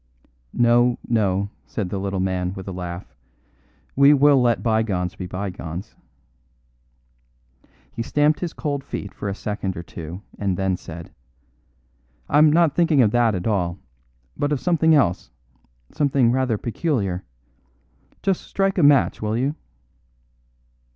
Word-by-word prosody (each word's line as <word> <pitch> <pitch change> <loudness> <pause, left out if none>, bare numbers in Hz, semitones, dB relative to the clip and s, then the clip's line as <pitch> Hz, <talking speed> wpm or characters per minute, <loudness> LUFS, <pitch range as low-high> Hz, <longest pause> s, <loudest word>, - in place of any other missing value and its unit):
"No, 120 +1 +4
no," 100 -3 0 0.2
said 100 -5 -4
the 100 - -2
little 100 0 -2
man 90 0 -1
with 95 -1 -8
a - - -4
laugh, 90 -4 -7 0.8
"we 140 +2 +6
will 140 -1 +5
let 120 -2 +1
bygones 110 -6 0
be 90 - -7
bygones." 90 0 -6 2.0
He - - -5
stamped 145 +5 +2
his 175 -2 -3
cold 140 -2 -3
feet 100 - -6
for 100 - -5
a 100 - -3
second 100 -3 -4
or 85 - -5
two, 85 +3 -8 0.2
and 95 -3 -1
then 95 -1 0
said: 85 -1 -10 1.2
"I'm 150 +1 +5
not 165 -2 +4
thinking 165 -6 +4
of 105 - +2
that 120 -3 +2
at 90 - -4
all, 90 -5 0 0.6
but 145 - -1
of 145 - +1
something 160 -1 +3
else; 90 - +1 0.6
something 135 -5 +2
rather 130 -3 +1
peculiar. 105 - -2 1.0
Just 195 -2 +1
strike 195 -1 -1
a - - +3
match, 145 -2 +4
will 110 +1 -1
you?" 135 +4 0
110 Hz, 135 wpm, -22 LUFS, 95-140 Hz, 2.0 s, we